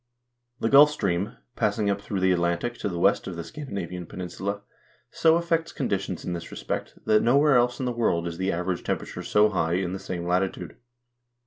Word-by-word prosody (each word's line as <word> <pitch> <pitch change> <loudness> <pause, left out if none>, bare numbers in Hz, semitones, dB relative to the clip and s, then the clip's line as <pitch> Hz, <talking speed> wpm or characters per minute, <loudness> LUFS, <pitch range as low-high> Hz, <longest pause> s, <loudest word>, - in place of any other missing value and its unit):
The - - 0
Gulf 145 +3 +8
Stream, 100 -6 -2 0.2
passing 105 - 0
up 100 0 0
through 100 -2 -3
the 95 0 +4
Atlantic 85 +6 0
to - - -2
the 85 - -4
west 95 +4 +2
of 90 - -5
the 85 - -5
Scandinavian 95 - -6
pen - - -10
insula, 100 +3 -4 0.5
so 160 0 +4
affects 170 -1 0
conditions 95 - -3
in 90 - -2
this 85 -1 -6
respect, - - -5
that 105 0 +4
nowhere 140 +4 +4
else 120 0 +2
in 130 - -2
the 125 - 0
world 110 -8 0
is 85 0 -6
the 95 +1 0
average 90 +1 -2
temperature - - -3
so 105 +1 +3
high 85 -5 0
in 90 0 -1
the 95 - -4
same 90 -2 -5
latitude. 90 +2 -1
95 Hz, 200 wpm, -26 LUFS, 90-120 Hz, 0.5 s, Gulf